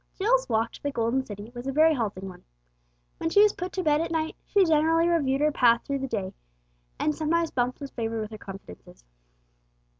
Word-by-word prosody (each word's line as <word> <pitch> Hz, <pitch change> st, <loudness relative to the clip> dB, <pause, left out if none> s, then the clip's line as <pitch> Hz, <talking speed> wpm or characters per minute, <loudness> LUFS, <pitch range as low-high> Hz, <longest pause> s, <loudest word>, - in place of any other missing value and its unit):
Jill's -, -, +1 dB
walk 225 Hz, 0 st, +1 dB
to -, -, -13 dB
the 285 Hz, -, -2 dB
Golden 235 Hz, +1 st, 0 dB
City 205 Hz, -1 st, -9 dB
was 245 Hz, +1 st, -7 dB
a -, -, 0 dB
very 315 Hz, +3 st, +4 dB
halting 205 Hz, -7 st, -3 dB
one. 185 Hz, -, -11 dB, 0.8 s
When 325 Hz, -, -1 dB
she 405 Hz, +5 st, +6 dB
was 425 Hz, -, +4 dB
put 360 Hz, +1 st, -5 dB
to 375 Hz, -, -2 dB
bed 300 Hz, -1 st, +3 dB
at 335 Hz, -, -2 dB
night 320 Hz, -1 st, -2 dB
she 400 Hz, -2 st, +4 dB
generally 325 Hz, +1 st, +3 dB
reviewed 285 Hz, -5 st, +1 dB
her 300 Hz, 0 st, +3 dB
path 235 Hz, -4 st, +3 dB
through 280 Hz, -1 st, -2 dB
the 270 Hz, -, -3 dB
day, 200 Hz, -6 st, -3 dB, 0.6 s
and 305 Hz, -, 0 dB
sometimes 325 Hz, +2 st, 0 dB
Bumps 250 Hz, 0 st, -1 dB
was 280 Hz, -2 st, -7 dB
favoured 225 Hz, -1 st, -3 dB
with 215 Hz, 0 st, -6 dB
her 215 Hz, -, -7 dB
confidences. 140 Hz, -, -12 dB
275 Hz, 210 wpm, -26 LUFS, 225-325 Hz, 0.8 s, she